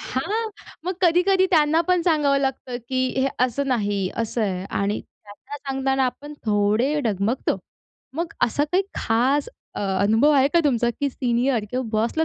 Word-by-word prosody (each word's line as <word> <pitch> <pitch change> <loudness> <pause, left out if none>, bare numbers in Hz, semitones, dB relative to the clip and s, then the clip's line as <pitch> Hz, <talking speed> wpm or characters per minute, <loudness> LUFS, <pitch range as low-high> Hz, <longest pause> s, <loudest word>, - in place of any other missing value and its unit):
हां, 430 - -2 0.3
मग 370 +2 -2
कधी-कधी 370 +2 +4
त्यांना 315 -2 +4
पण 360 -1 +3
सांगावं 295 -5 +2
लागतं, 265 -2 -2
की 260 0 +1
"हे 270 - +2 0.2
असं 255 +3 -2
नाही, 205 -6 0
असं 230 +1 -2
आहे" 185 -3 -2
आणि 200 +1 -2
त्यांना 215 +7 -12
सांगताना 270 -1 -1
आपण 290 +4 -5
थोडे 215 +7 +2
डगमगतो. 215 +3 0 0.6
मग 335 +2 -3
असा 285 +5 0
काही 370 +2 +3
खास 255 +6 +1 0.3
अ, - - -4 0.2
अनुभव 220 +8 +4
आहे 270 0 +4
का 340 - +5
तुमचा, 240 -4 +2
की 280 +4 -2
सीनियर 245 -2 0
किंवा 255 +1 -2
बॉसला 230 +9 +1
265 Hz, 155 wpm, -23 LUFS, 225-295 Hz, 0.6 s, का